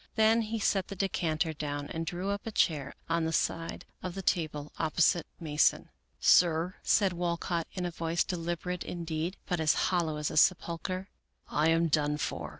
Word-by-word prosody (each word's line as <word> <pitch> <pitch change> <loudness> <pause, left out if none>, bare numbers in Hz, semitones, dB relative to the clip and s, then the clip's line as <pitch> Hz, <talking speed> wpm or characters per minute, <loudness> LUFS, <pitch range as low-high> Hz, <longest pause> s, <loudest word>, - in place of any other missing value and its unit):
Then 220 +1 +4
he 225 +1 -3
set 195 -3 +1
the 195 - -6
decanter 165 -4 0
down 145 -1 -4
and 165 0 -4
drew 180 +3 -2
up 200 +2 -4
a - - -2
chair 145 -9 +1
on 165 0 +1
the 160 - -1
side 165 +1 -1 0.2
of 180 -2 -5
the 195 - -5
table 150 -5 -1
opposite 165 +1 +2
Mason. 150 -3 +2 0.2
" - - -43
Sir," 175 +1 +4
said 195 -4 +3
Walcott, 170 -1 -2
in 180 -2 -3
a 175 - -2
voice 165 +1 0
deliberate, 175 0 -3
indeed, 170 +1 -3
but 175 -2 -1
as 160 0 +3 0.2
hollow 165 -4 0
as 150 -1 -2
a - - -4
sepulcher, 185 +3 +1 0.3
" - - -49
I 155 +2 +2
am 165 +1 +3
done 150 -1 +1
for. - - -3
170 Hz, 185 wpm, -30 LUFS, 160-185 Hz, 0.3 s, Then